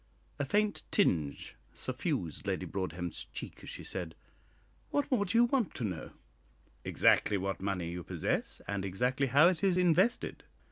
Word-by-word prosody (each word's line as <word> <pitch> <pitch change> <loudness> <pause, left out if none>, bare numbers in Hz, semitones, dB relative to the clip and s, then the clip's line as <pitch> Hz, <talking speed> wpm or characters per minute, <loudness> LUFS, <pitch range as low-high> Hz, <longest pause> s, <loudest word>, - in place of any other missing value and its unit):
A 145 - 0
faint 210 +7 +1
tinge 80 - +1 0.2
suffused 80 -3 -3
Lady - - -1
Broadhem's 90 -2 -3
cheek - - -8
as - - -9
she - - -7
said, 85 -4 -4 0.7
"What 285 -1 0
more 220 -6 +3
do 215 +4 0
you 235 - +7
want 240 -3 +1
to 125 - -4
know?" 90 -7 -3 0.7
"Exactly 105 - +3
what 95 -2 -3
money 95 -4 -2
you 90 0 -5
possess, - - -2
and 100 -1 -2
exactly 125 +8 0
how 145 +6 +6
it 180 -1 +1
is 190 -2 +3
invested." 180 +6 +2
125 Hz, 155 wpm, -32 LUFS, -, 0.7 s, you